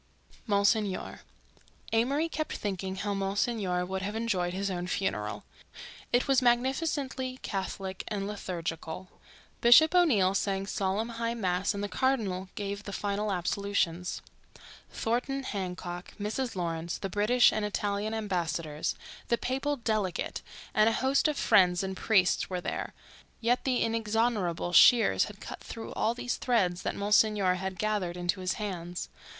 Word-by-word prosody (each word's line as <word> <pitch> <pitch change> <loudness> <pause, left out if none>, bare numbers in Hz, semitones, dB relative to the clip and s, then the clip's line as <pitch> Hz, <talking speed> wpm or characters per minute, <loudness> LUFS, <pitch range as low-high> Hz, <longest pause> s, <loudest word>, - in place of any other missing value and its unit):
MONSIGNOR 205 -1 +1 0.7
Amory 275 +8 +2
kept 310 -1 -3
thinking 190 -2 -3
how 200 +2 -2
Monsignor 195 -2 0
would 190 +1 -3
have 205 +3 -3
enjoyed 200 -6 0
his 195 +2 -2
own 175 -1 -3
funeral. 105 - -2 0.7
It 245 +1 +2
was 270 -2 +4
magnificently 260 +1 0
Catholic 190 -1 -4
and 200 -2 -2
liturgical. 180 -3 -5 0.5
Bishop 280 +8 +7
O'Neill 235 - +4
sang 195 0 0
solemn 200 +3 -1
high 230 0 -2
mass 190 -2 0
and 200 - -3
the - - -1
cardinal 205 -7 0
gave 200 0 -4
the 205 - -7
final 205 +1 -1
absolutions. 180 -1 -1 0.7
Thornton 250 +4 -1
Hancock, 180 -4 -5
Mrs. 225 +4 -2
Lawrence, 170 -1 -2
the - - -4
British 210 +6 +4
and 215 - -1
Italian 210 +1 -1
ambassadors, 170 -7 -2 0.3
the 235 - +2
papal 270 +4 -1
delegate, 215 -6 -1 0.3
and 215 +1 +5
a - - 0
host 265 +5 +2
of 300 -2 -1
friends 180 -1 +4
and 190 0 -3
priests 185 -3 +2
were 180 -1 -2
there—yet 235 +6 -4
the 255 -2 +2
inexorable 220 -6 0
shears 235 +6 +6
had - - -11
cut - - -8
through 225 - -8
all 230 +2 0
these 245 0 -2
threads 185 -8 +1
that - - -2
Monsignor 205 -2 +3
had 190 0 -4
gathered 200 -4 -1
into 175 +2 -1
his 185 0 0
hands. 180 -4 -4
200 Hz, 140 wpm, -29 LUFS, 185-230 Hz, 0.7 s, Bishop